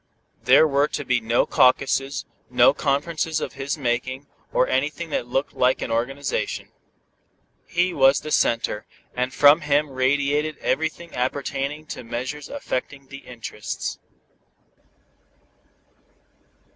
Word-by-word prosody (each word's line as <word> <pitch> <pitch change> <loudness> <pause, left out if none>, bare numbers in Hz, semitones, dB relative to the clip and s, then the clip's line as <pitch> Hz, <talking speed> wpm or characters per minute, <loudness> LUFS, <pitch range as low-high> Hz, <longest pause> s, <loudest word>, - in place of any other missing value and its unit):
There 135 +6 +7
were 140 0 +2
to 145 - -4
be 125 -2 +1
no 115 +2 +2
caucuses, 135 +1 +2 0.2
no - - +5
conferences 155 +3 -1
of - - -5
his 140 +2 -3
making, 130 +1 -2 0.3
or 130 - +2
anything 150 +5 -1
that 120 - -1
looked 135 +3 -1
like 125 +1 +2
an - - -4
organization. 135 +5 -2 1.0
He 180 +1 +1
was 135 -1 +5
the 155 - -7
center, 115 -5 +1 0.3
and 125 +1 -1
from 145 +4 +6
him 145 0 +1
radiated 140 +3 +1
everything 165 +2 -2
appertaining 140 +3 -2
to - - -6
measures 125 +5 -5
affecting 140 - -5
"the 135 - -8
interests." 115 -4 -6
140 Hz, 120 wpm, -23 LUFS, 125-150 Hz, 1.0 s, There